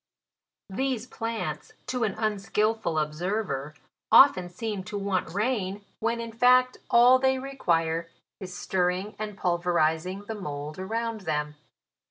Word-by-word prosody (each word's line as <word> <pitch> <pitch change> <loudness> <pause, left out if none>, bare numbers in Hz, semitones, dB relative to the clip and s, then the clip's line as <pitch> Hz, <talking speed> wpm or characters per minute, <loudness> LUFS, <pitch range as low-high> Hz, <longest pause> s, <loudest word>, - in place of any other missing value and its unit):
These 255 +2 -1
plants, 225 -2 -4
to 250 -2 -2
an 205 -3 0
unskilful 215 -3 0
observer, 155 -2 -2 0.4
often 185 -10 +7
seem 205 +1 -4
to 210 +1 -5
want 195 -4 -1
rain, 205 -1 -1
when 230 +1 0
in 230 0 -5
fact 250 +2 +4
all 245 +2 +7
they 265 0 +2
re 270 +1 -7
quire 165 -6 0 0.3
is 185 -2 -7
stirring 185 +2 -1
and 210 -2 -5
pulverizing 175 +1 0
the 225 - -4
mould 150 -5 -6
around 225 +3 -3
them. 150 -1 -1
200 Hz, 130 wpm, -27 LUFS, 175-230 Hz, 0.4 s, often